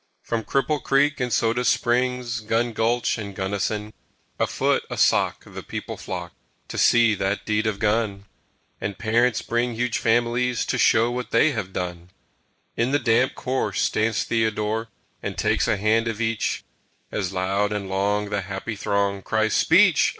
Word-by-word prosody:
From 115 Hz, -1 st, -2 dB
Cripple 140 Hz, +4 st, 0 dB
Creek 145 Hz, +1 st, +2 dB
and 125 Hz, -1 st, -1 dB
Soda 115 Hz, +2 st, +1 dB
Springs, 125 Hz, 0 st, +1 dB
Gun 115 Hz, +2 st, -1 dB
Gulch 115 Hz, +1 st, 0 dB
and 100 Hz, -2 st, -6 dB
Gunnison, 105 Hz, +2 st, -2 dB, 0.5 s
A -, -, +2 dB
foot, -, -, +1 dB
a -, -, -5 dB
sock, -, -, +2 dB
the -, -, -8 dB
people -, -, -6 dB
flock 90 Hz, -2 st, -6 dB, 0.4 s
To -, -, -4 dB
see 115 Hz, -2 st, +5 dB
that 95 Hz, 0 st, -2 dB
deed 110 Hz, 0 st, 0 dB
of 105 Hz, -2 st, -1 dB
gun; 105 Hz, -2 st, 0 dB, 0.5 s
And 100 Hz, -2 st, -4 dB
parents 115 Hz, +1 st, +1 dB
bring 120 Hz, 0 st, -1 dB
huge 120 Hz, +1 st, -1 dB
families 120 Hz, +1 st, +1 dB
To -, -, -1 dB
show 115 Hz, +2 st, +4 dB
what 125 Hz, 0 st, -4 dB
they 155 Hz, -, +4 dB
have 110 Hz, -7 st, -4 dB
done. 90 Hz, -1 st, -5 dB, 0.7 s
In 120 Hz, +2 st, +1 dB
the 140 Hz, -, +3 dB
damp 125 Hz, -1 st, +2 dB
corse 130 Hz, +1 st, -2 dB
stands 110 Hz, 0 st, +1 dB
Theodore 110 Hz, 0 st, -1 dB, 0.3 s
And -, -, -5 dB
takes -, -, +1 dB
a 105 Hz, -, +2 dB
hand 110 Hz, +3 st, +2 dB
of 115 Hz, -1 st, -3 dB
each, 115 Hz, -1 st, -1 dB, 0.5 s
As 95 Hz, -3 st, -2 dB
loud 95 Hz, +2 st, 0 dB
and 105 Hz, -2 st, -3 dB
long 100 Hz, +2 st, 0 dB
the 105 Hz, -1 st, 0 dB
happy 100 Hz, +4 st, -5 dB
throng 100 Hz, -1 st, 0 dB
Cries, 110 Hz, +1 st, 0 dB
"Speech!" -, -, +5 dB
110 Hz, 165 wpm, -24 LUFS, 100-120 Hz, 0.7 s, see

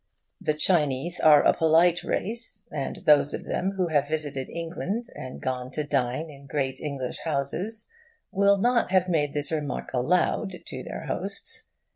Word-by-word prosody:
The 155 Hz, -, 0 dB
Chinese 150 Hz, -1 st, +1 dB
are 150 Hz, -2 st, +7 dB
a -, -, +6 dB
polite 165 Hz, +2 st, +4 dB
race, 225 Hz, -1 st, -3 dB
and 140 Hz, -3 st, -4 dB
those 145 Hz, -1 st, +5 dB
of -, -, -8 dB
them 190 Hz, +2 st, -1 dB
who 180 Hz, -2 st, +1 dB
have 145 Hz, -2 st, +2 dB
visited 145 Hz, -3 st, -3 dB
England, 175 Hz, +7 st, -3 dB
and 130 Hz, 0 st, -8 dB
gone 130 Hz, -1 st, -3 dB
to 150 Hz, -, -1 dB
dine 140 Hz, +1 st, -1 dB
in 140 Hz, -2 st, -13 dB
great 135 Hz, -1 st, -2 dB
English 140 Hz, -4 st, -4 dB
houses, 165 Hz, +9 st, -2 dB, 0.4 s
will 200 Hz, +1 st, +4 dB
not 240 Hz, +4 st, +2 dB
have 185 Hz, -1 st, +3 dB
made 150 Hz, -5 st, +1 dB
this 145 Hz, +1 st, +2 dB
remark 150 Hz, -4 st, -3 dB
aloud 180 Hz, +7 st, +1 dB
to -, -, -6 dB
their -, -, -6 dB
hosts. -, -, -1 dB
155 Hz, 160 wpm, -26 LUFS, 140-180 Hz, 0.4 s, are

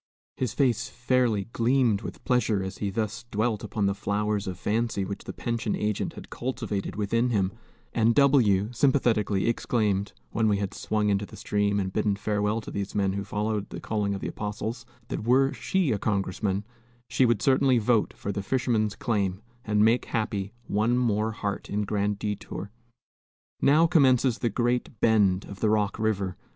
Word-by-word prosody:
His 130 Hz, -3 st, -2 dB
face 125 Hz, -6 st, +1 dB
fairly 125 Hz, -5 st, +1 dB
gleamed 120 Hz, -3 st, +2 dB
with -, -, -8 dB
pleasure 115 Hz, -6 st, +2 dB
as 95 Hz, -, -6 dB
he 100 Hz, -, -1 dB
thus 110 Hz, +3 st, -3 dB
dwelt 110 Hz, 0 st, -1 dB
upon 105 Hz, -2 st, -1 dB
the 100 Hz, -, +2 dB
flowers 105 Hz, 0 st, -1 dB
of 90 Hz, -2 st, -4 dB
fancy 110 Hz, -1 st, -1 dB
which 100 Hz, +1 st, -6 dB
the -, -, -5 dB
pension 115 Hz, -2 st, -2 dB
agent 105 Hz, -1 st, -1 dB
had -, -, -11 dB
cultivated 115 Hz, -6 st, -3 dB
within 115 Hz, +4 st, +1 dB
him; 100 Hz, -5 st, +1 dB, 0.4 s
and 115 Hz, 0 st, +3 dB
W 115 Hz, -8 st, +4 dB
sympathetically 115 Hz, -7 st, +2 dB
exclaimed, 105 Hz, -, 0 dB, 0.2 s
when 110 Hz, 0 st, +1 dB
we 105 Hz, -1 st, +3 dB
had 100 Hz, -1 st, -3 dB
swung 105 Hz, -1 st, 0 dB
into 100 Hz, 0 st, 0 dB
the -, -, -12 dB
stream 105 Hz, 0 st, 0 dB
and 95 Hz, -1 st, -2 dB
bidden 105 Hz, -2 st, +1 dB
farewell 105 Hz, +2 st, -1 dB
to -, -, -9 dB
these 100 Hz, 0 st, -4 dB
men 100 Hz, -2 st, +1 dB
who 100 Hz, 0 st, -3 dB
followed 105 Hz, 0 st, -2 dB
the -, -, -6 dB
calling 105 Hz, -2 st, -1 dB
of 95 Hz, -, -6 dB
the -, -, -3 dB
apostles, 110 Hz, +3 st, -4 dB, 0.2 s
that -, -, -3 dB
were 135 Hz, +4 st, +3 dB
she 190 Hz, -7 st, 0 dB
a 105 Hz, -, 0 dB
congressman 100 Hz, 0 st, -1 dB, 0.4 s
she 125 Hz, +2 st, +2 dB
would 120 Hz, -4 st, +2 dB
certainly 135 Hz, -1 st, +4 dB
vote 115 Hz, -1 st, +2 dB
for 100 Hz, -, -3 dB
the 100 Hz, -, -3 dB
fisherman's 110 Hz, -2 st, 0 dB
claim, 100 Hz, -5 st, -1 dB, 0.2 s
and 105 Hz, 0 st, +3 dB
make 115 Hz, +3 st, +3 dB
happy 105 Hz, -4 st, -2 dB
one 110 Hz, +4 st, +1 dB
more 110 Hz, -3 st, +1 dB
heart 105 Hz, -2 st, -4 dB
in 105 Hz, +1 st, -1 dB
Grand 105 Hz, 0 st, -1 dB
Detour. 100 Hz, -1 st, -5 dB, 0.9 s
Now 150 Hz, +4 st, +5 dB
commences 130 Hz, -7 st, +4 dB
the 120 Hz, -, +1 dB
Great 120 Hz, 0 st, -1 dB
Bend 100 Hz, -4 st, +3 dB
of 100 Hz, -, -10 dB
the 110 Hz, -, +2 dB
Rock 105 Hz, -1 st, +1 dB
River. 100 Hz, -4 st, -1 dB
105 Hz, 175 wpm, -27 LUFS, 100-120 Hz, 0.9 s, Now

